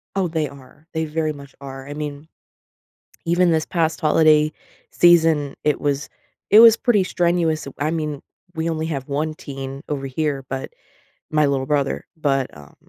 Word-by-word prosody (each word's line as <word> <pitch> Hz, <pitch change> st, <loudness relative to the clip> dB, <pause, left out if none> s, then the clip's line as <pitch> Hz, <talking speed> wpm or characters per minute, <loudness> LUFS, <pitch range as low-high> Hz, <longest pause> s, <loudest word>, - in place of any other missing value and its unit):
Oh, 195 Hz, -2 st, +1 dB
they 160 Hz, -2 st, -1 dB
are. 140 Hz, +2 st, -16 dB
They 160 Hz, 0 st, -1 dB
very 155 Hz, 0 st, -1 dB
much 140 Hz, -1 st, -12 dB
are. 135 Hz, 0 st, -8 dB
I 145 Hz, -, -6 dB
mean, 145 Hz, 0 st, -6 dB, 1.0 s
even 175 Hz, +1 st, +3 dB
this 160 Hz, -1 st, +1 dB
past 165 Hz, -2 st, 0 dB
holiday 155 Hz, -1 st, +4 dB, 0.4 s
season, 160 Hz, -5 st, +4 dB
it 150 Hz, -, +1 dB
was 145 Hz, 0 st, -1 dB, 0.4 s
it 210 Hz, -, +8 dB
was 230 Hz, -1 st, +9 dB
pretty 225 Hz, -6 st, +2 dB
strenuous. 170 Hz, -3 st, 0 dB
W 140 Hz, -, -9 dB
I 155 Hz, -, 0 dB
mean, 150 Hz, -3 st, -3 dB, 0.3 s
we 160 Hz, +1 st, -1 dB
only 160 Hz, -1 st, -2 dB
have 135 Hz, -5 st, -4 dB
1 150 Hz, +2 st, -2 dB
teen 135 Hz, -2 st, -7 dB
over 140 Hz, -2 st, -3 dB
here, 140 Hz, 0 st, -2 dB
but- 135 Hz, -1 st, -4 dB, 0.6 s
my 150 Hz, -1 st, +4 dB
little 135 Hz, -2 st, 0 dB
brother- 140 Hz, -1 st, -1 dB
but, 135 Hz, -4 st, 0 dB
um, 70 Hz, -1 st, -15 dB
150 Hz, 170 wpm, -21 LUFS, 140-160 Hz, 1.0 s, was